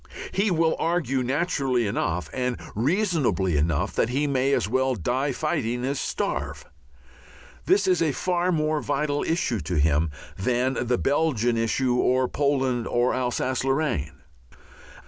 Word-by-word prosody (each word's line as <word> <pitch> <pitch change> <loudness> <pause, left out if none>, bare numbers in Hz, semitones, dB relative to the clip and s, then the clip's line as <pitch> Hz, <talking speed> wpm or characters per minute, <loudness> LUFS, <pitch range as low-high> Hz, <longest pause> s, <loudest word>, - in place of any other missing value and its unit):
He 200 +2 +1
will 165 -2 +2
argue 155 -6 0
naturally 135 -3 0
enough 90 -5 -1
and 125 -1 -2 0.2
reasonably 130 - +1
enough 80 +5 0
that 115 - +1
he 140 +4 0
may 135 -1 +1
as 95 - +1
well 130 +3 +1
die 130 - -1
fighting 125 -5 -1
as 140 +1 -1
starve. - - -3 1.0
This 200 0 +4
is 180 -3 +2
a 160 -3 +2
far 180 +4 0
more 155 -2 0
vital 145 0 -1
issue 160 - 0
to 85 +2 -3
him 75 +1 +2 0.3
than 125 +4 0
the 125 0 +2
Belgian 135 -5 +1
issue 115 +3 +1
or 130 +1 +2
Poland 135 -5 0
or 120 +1 +1
Alsace 130 0 -1
Lorraine. 135 - -1
130 Hz, 140 wpm, -25 LUFS, 115-150 Hz, 1.0 s, This